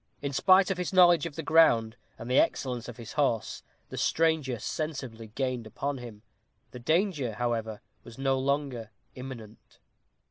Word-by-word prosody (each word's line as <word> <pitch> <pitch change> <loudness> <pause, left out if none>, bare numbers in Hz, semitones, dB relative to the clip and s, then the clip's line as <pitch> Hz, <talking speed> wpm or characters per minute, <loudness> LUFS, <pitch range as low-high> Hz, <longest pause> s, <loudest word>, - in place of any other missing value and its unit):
In 140 0 -2
spite 185 +7 +5
of 185 - -2
his 180 - -2
knowledge 175 -4 +5
of 155 - -10
the 160 - -5
ground, 125 -9 +4 0.2
and 115 - -8
the 125 +2 +4
excellence 125 -3 -1
of 120 - -9
his 115 -1 -9
horse, 135 -7 0 0.3
the - - -6
stranger 160 -6 +1
sensibly 130 -4 -5
gained 125 0 -3
upon 140 +4 -4
him. 115 -3 -10 0.5
The 125 - -9
danger, 155 - 0
however, 115 -1 -2 0.2
was 115 - -13
no 135 0 +1
longer 135 -4 -2 0.2
imminent. 120 -4 -10
130 Hz, 155 wpm, -28 LUFS, 115-155 Hz, 0.5 s, spite